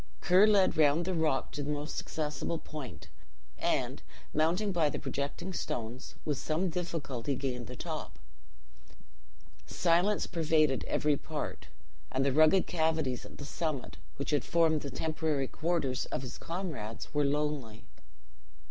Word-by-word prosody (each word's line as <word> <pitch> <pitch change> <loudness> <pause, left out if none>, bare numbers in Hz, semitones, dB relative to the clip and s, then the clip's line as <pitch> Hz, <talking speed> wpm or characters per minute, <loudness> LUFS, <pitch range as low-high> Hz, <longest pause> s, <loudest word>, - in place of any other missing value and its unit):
Ker 185 +4 +6
led 200 -5 +4
round 155 +2 +4
the 185 - 0
rock 155 -5 +1
to 145 - -4
the 145 - -3
most 150 +1 -2
accessible 155 +2 -2
point; 130 - -8 0.5
and, - - 0 0.3
mounting 175 +7 +2
by 165 -5 +3
the - - -3
projecting 140 +7 -3
stones, 120 -6 -4
with 145 -3 0
some 165 +3 0
difficulty 145 -7 -2
gained 125 -3 -3
the - - -7
top. - - -5 1.5
Silence 180 +4 +3
pervaded 155 -4 +2
every 150 -1 +2
part; 155 +1 -5 0.4
and 135 +1 +1
the 140 - +3
rugged 155 +5 +6
cavities 160 -6 0
at - - -14
the 145 - -7
summit, 140 - -3 0.2
which - - -3
had 145 - +2
formed 160 -3 +3
the 140 - -4
temporary 155 -3 -1
quarters 155 -6 -1
of - - -3
his 125 - -7
comrades, 155 - -5
were 145 0 +3
lonely. 140 -6 -1
150 Hz, 140 wpm, -32 LUFS, 135-165 Hz, 1.5 s, Ker